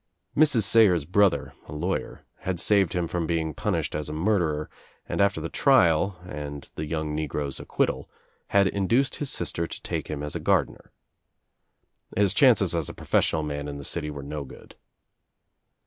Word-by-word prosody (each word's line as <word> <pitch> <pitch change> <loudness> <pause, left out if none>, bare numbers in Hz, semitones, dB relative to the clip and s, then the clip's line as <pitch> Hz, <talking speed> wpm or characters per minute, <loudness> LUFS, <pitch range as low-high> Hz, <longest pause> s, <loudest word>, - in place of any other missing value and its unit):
Mrs. 145 -7 +4
Sayers' 100 -7 +4
brother, 100 +3 +2
a - - -8
lawyer, 85 +6 -3
had 90 -2 -3
saved 100 -2 +3
him 90 -2 -1
from 85 -1 -2
being 80 -2 -1
punished - - -2
as 75 0 -3
a - - -4
murderer 80 -3 0 0.4
and - - -1
after 100 -4 +2
the 80 - -3
trial, 95 - +3
and 75 -4 -7
the 75 - -5
young 75 -1 -2
negro's 75 -2 -3
acquittal, - - -1 0.4
had 100 -1 +4
induced 115 +8 +1
his 145 - -3
sister 85 -4 -2
to - - -8
talte - - -3
him 75 -1 -4
as 75 - -5
gardener. - - 0 1.3
His 100 -2 +3
chances 110 -7 +5
as 85 -4 -1
a - - -8
professional 80 - +1
man 75 -1 -4
in 70 -1 -5
the 70 - -8
city 80 -3 -3
were 70 -2 -7
no 75 +1 -5
good. 65 - -13
85 Hz, 165 wpm, -26 LUFS, 75-100 Hz, 1.3 s, chances